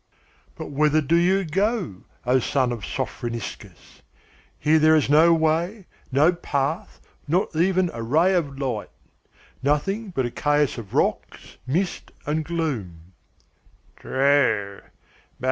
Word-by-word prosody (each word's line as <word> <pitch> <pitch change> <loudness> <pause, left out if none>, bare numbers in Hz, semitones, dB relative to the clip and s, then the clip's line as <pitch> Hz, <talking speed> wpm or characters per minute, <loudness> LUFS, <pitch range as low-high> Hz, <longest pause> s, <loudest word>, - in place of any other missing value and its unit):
"But - - -7
whither 150 +2 +3
do 155 +2 +1
you 185 +3 +3
go, 190 - -1 0.2
O 125 +2 +3
son 130 0 0
of 115 -4 -5
Sophroniscus? 115 +2 -6 0.6
Here 155 +2 +3
there 155 +1 +5
is 145 -2 +2
no 160 +3 +6
way, 165 +5 +1 0.3
no 150 +7 +4
path, 145 -1 -3 0.3
not 175 +2 0
even 180 +1 +2
a 115 - -6
ray 160 +11 +3
of 145 -7 -1
light; 125 -6 -3 0.7
nothing 195 +10 0
but 135 -8 -1
a 120 - -3
chaos 145 -2 +1
of 105 -5 -9
rocks, - - -2
mist, 175 +8 -2
and 155 +2 -1
gloom." 110 - -4 0.8
"True. 130 -8 +1
150 Hz, 125 wpm, -23 LUFS, 130-170 Hz, 0.8 s, no